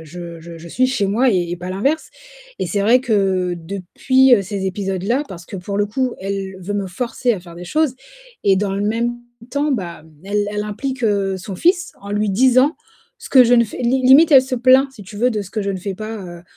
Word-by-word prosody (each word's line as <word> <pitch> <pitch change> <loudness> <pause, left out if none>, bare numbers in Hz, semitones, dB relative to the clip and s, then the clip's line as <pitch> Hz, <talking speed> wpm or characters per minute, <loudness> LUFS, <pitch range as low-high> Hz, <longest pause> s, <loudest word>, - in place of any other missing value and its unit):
je 170 +1 -9
je 170 0 -10
je 170 +1 -11
suis 255 +9 +1
chez 255 -6 0
moi 240 +6 +2
et 175 -4 0
et 175 - -3
pas 180 +1 -7
l'inverse 275 +12 -1 0.5
et - - -2
c'est 205 - -1
vrai 235 +5 +5
que 195 -7 0
depuis, 200 +9 +2
heu, 200 - +1
ces 195 0 -4
épisodes-là 195 +6 -1
parce 170 -2 -10
que 195 - -7
pour 200 +2 -4
le 205 - +2
coup, 255 +4 -2
elle 195 0 -4
veut 200 +3 -4
me 200 -1 -2
forcer 240 +5 -1
à 195 - -4
faire 170 -1 -13
des 175 +1 -9
choses 305 - 0 0.5
et 195 -1 +4
dans 195 0 -1
le 200 - -2
même 230 +3 -1 0.3
temps, 290 +2 0
ben, 175 -9 -4 0.2
elle 205 +1 -1
elle 210 0 -3
implique 245 +4 -4 0.3
son 185 0 -7
fils, 355 - +1
en 200 - -8
lui 210 +1 0
disant 255 - +3 0.4
ce 470 - -11
que 260 -2 +7
je 245 +1 +4
ne 235 -1 +5
fais 215 - -9
limite, 265 +5 +5
elle 270 -3 +8
se 265 0 -3
plaint, 260 +2 +4
si 215 - -12
tu 200 +2 -11
veux, 245 +4 +2
de 215 -3 -2
ce 195 - -7
que 215 -1 -3
je 200 - -2
ne 190 - -3
fais 195 +1 -5
pas, 215 +3 -6
heu, 175 -3 -9
205 Hz, 235 wpm, -19 LUFS, 190-255 Hz, 0.5 s, elle